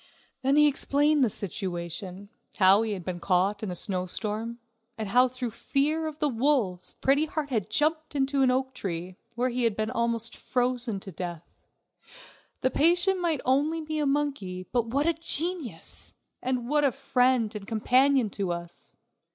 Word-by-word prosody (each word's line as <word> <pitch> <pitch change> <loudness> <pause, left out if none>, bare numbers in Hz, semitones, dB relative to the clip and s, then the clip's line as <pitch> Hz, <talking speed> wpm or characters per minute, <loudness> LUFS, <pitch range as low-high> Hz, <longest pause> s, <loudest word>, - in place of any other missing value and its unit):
Then 270 +2 +2
he 300 0 +6
explained 290 +1 +2
the 240 - +3
situation, 185 0 -4 0.3
how 195 +1 +6
he 225 -2 -1
had 185 -4 -6
been 180 -1 -4
caught 190 +3 +1
in 215 - -3
a 180 - -4
snowstorm, 210 +5 -3 0.4
and 215 -3 -4
how 250 +4 +5
through 250 -1 -4
fear 300 +7 0
of 305 -1 -6
the 300 - +1
wolves 235 -8 0
Pretty 280 +3 +3
Heart 300 -2 -4
had 215 -5 -1
jumped 310 +6 0
up 275 0 0
in 275 - +3
an 260 - +4
oak 260 +1 0
tree, 180 -2 -5 0.2
where 250 +2 +1
he 250 0 -1
had 230 -3 +2
been 215 +1 -2
almost 235 -1 0
frozen 245 -4 -1
to 195 - -5
death. 175 -1 -6 1.1
The 260 - +1
patient 350 +4 +3
might 330 -6 0
be - - -23
only 310 +4 0
a 295 - +1
monkey, 275 -11 -1
but 235 -2 +1
what 280 +6 0
a 335 - +3
genius! 325 - -3 0.3
and 250 -2 -1
what 295 +2 +2
a 280 - +4
friend 250 -4 +1
and 205 -2 -7
companion 250 +1 +3
to 195 -3 -2
us! 170 0 -8
245 Hz, 175 wpm, -27 LUFS, 200-285 Hz, 1.1 s, he